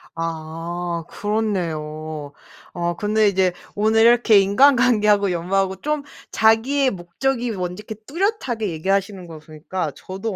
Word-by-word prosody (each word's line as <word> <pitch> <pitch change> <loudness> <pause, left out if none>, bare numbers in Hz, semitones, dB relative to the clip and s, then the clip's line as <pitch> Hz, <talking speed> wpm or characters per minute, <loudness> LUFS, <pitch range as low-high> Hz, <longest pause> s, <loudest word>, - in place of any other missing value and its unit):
아 165 +1 -4
그렇네요. 155 -8 -3 0.4
어 175 -1 -2
근데 210 0 +2
이제 190 -2 +1 0.2
오늘 220 +2 +3
이렇게 235 -2 +6
인간관계하고 210 -3 +4
연마하고 190 +2 -1
좀 300 - -2 0.3
자기의 255 +5 +3
목적이 235 +7 -2
뭔지 180 -1 -4
이렇게 220 - -5
뚜렷하게 275 - -1
얘기하시는 195 +3 -1
거 165 -2 -10
보니까 155 +2 -5
저도 195 +2 -6
195 Hz, 300 characters per minute, -21 LUFS, 170-225 Hz, 0.4 s, 이렇게